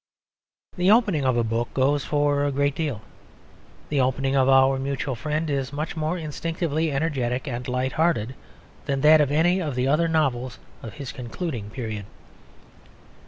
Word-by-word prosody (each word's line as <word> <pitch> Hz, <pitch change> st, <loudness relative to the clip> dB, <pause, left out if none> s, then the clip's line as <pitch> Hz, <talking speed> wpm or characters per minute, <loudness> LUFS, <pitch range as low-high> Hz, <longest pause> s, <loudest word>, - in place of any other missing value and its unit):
The 180 Hz, +1 st, +2 dB
opening 205 Hz, -, +3 dB
of 130 Hz, -2 st, +2 dB
a 120 Hz, -, +2 dB
book 115 Hz, +1 st, -2 dB
goes 140 Hz, +1 st, +2 dB
for 145 Hz, -1 st, +1 dB
a 145 Hz, -, 0 dB
great 140 Hz, +1 st, +1 dB
deal. 140 Hz, -9 st, -3 dB, 0.9 s
The 145 Hz, -2 st, +1 dB
opening 135 Hz, +1 st, 0 dB
of 135 Hz, -1 st, +3 dB
Our 135 Hz, 0 st, +5 dB
Mutual 135 Hz, 0 st, -2 dB
Friend 150 Hz, +6 st, -2 dB
is 140 Hz, -3 st, -2 dB
much 150 Hz, +4 st, -4 dB
more 160 Hz, +2 st, -1 dB
instinctively 160 Hz, 0 st, -2 dB
energetic 135 Hz, -3 st, -1 dB
and 125 Hz, -1 st, -4 dB
light 125 Hz, +1 st, -1 dB
hearted 145 Hz, -8 st, 0 dB, 0.5 s
than 140 Hz, -2 st, -1 dB
that 155 Hz, +1 st, +7 dB
of 145 Hz, -2 st, +1 dB
any 175 Hz, +5 st, +3 dB
of 150 Hz, -6 st, -3 dB
the 125 Hz, +1 st, 0 dB
other 155 Hz, +4 st, +2 dB
novels 130 Hz, -6 st, 0 dB, 0.2 s
of 110 Hz, -4 st, -9 dB
his 140 Hz, -3 st, -6 dB
concluding 120 Hz, -, -5 dB
period. 110 Hz, -4 st, -5 dB
140 Hz, 165 wpm, -24 LUFS, 130-155 Hz, 0.9 s, that